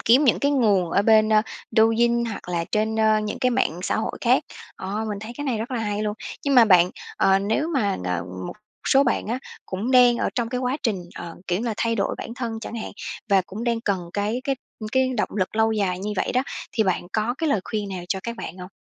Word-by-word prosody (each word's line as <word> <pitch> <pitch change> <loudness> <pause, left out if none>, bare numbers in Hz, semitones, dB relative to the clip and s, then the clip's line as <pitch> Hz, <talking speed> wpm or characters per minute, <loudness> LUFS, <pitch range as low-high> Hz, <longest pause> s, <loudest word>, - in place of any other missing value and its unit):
kiếm 255 +6 +5
những 250 - +4
cái 285 - +2
nguồn 205 -10 +3
ở 200 - +3
bên, 215 0 +5
a, 215 - +5 0.3
Douyin 235 +2 +3
hoặc 220 -5 -6
là 170 -1 -1
trên, 220 +1 +1
ờ, 220 -1 +4
những 210 0 -4
cái 255 - +2
mạng 240 -9 0
xã - - 0
hội - - -3
khác, - - +3 0.3
ờ, 210 +3 -3
mình 205 -1 -3
thấy 220 +2 -7
cái 290 - -4
này 245 -5 0
rất 230 +4 -4
là 250 - -1
hay 210 -1 -2
luôn. 210 -1 -1 0.3
Nhưng 280 - +2
mà 245 -2 +8
bạn, 180 -4 +5 0.3
ờ, 195 0 +4
nếu 220 +11 0
mà, 230 -11 +1
ờ, 90 -2 -1 0.2
một - - -5 0.4
số 270 - +6
bạn 245 - 0
á 235 +4 -1 0.3
cũng 200 +7 -3
đang 250 -2 +6
ở - - 0
trong 235 -2 -1
cái 250 0 -2
quá 255 +2 0
trình, 225 -6 +1 0.2
ờ, 170 -1 -7
kiểu 175 +1 0
như 240 - -3
là, 225 - -1
thay 230 0 0
đổi 200 -2 0
bản 230 - -6
thân 230 -3 -4
chẳng 230 - -7
hạn, 225 - -5 0.4
và 195 -2 +5
cũng 215 +5 -6
đang 235 -1 0
cần 185 -6 -2
cái 210 +4 -1
cái 275 - +1 0.4
cái 260 0 +2
động 210 - +1
lực 190 +3 -1
lâu 220 0 +3
dài 190 -4 0
như 210 +2 -3
vậy - - 0
đó, 255 - +2 0.3
thì 220 - +2
bạn 185 -1 0
có 220 +3 0
cái 325 -2 0
lời 215 -9 +2
khuyên 210 -2 -3
nào 185 -2 -5
cho 190 - -1
các 235 0 -5
bạn 175 - -7
hông? 180 +1 -8
220 Hz, 255 wpm, -24 LUFS, 200-240 Hz, 0.4 s, mà